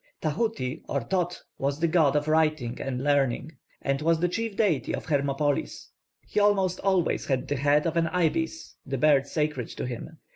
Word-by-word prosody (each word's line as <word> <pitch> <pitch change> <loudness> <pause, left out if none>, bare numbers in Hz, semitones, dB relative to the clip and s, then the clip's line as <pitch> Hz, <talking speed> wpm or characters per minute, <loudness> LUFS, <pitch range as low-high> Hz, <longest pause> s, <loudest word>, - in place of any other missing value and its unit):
+Tahuti+ 155 - -2
or 140 - 0
+Thōth+ 175 +6 -1 0.2
was 140 +2 -1
the 170 - +2
god 160 -4 +3
of 150 0 +1
writing 155 -6 +1
and 130 -1 -3
learning, 140 0 +1 0.3
and 140 +1 0
was 165 +1 +2
the 175 - +2
chief 225 +3 -3
deity 185 -11 +1
of - - -7
Hermopolis. 140 0 -1 0.3
He - - -1
almost 195 -3 +2
always 190 -3 +1
has 130 -3 0
the 145 - -2
head 145 +3 +3
of 165 - -1
an 165 -1 +2
ibis, 320 - -1
the 135 0 -3
bird 140 0 +4
sacred 150 -6 -2
to - - -5
him. 130 +6 -7
155 Hz, 180 wpm, -27 LUFS, 140-175 Hz, 0.3 s, bird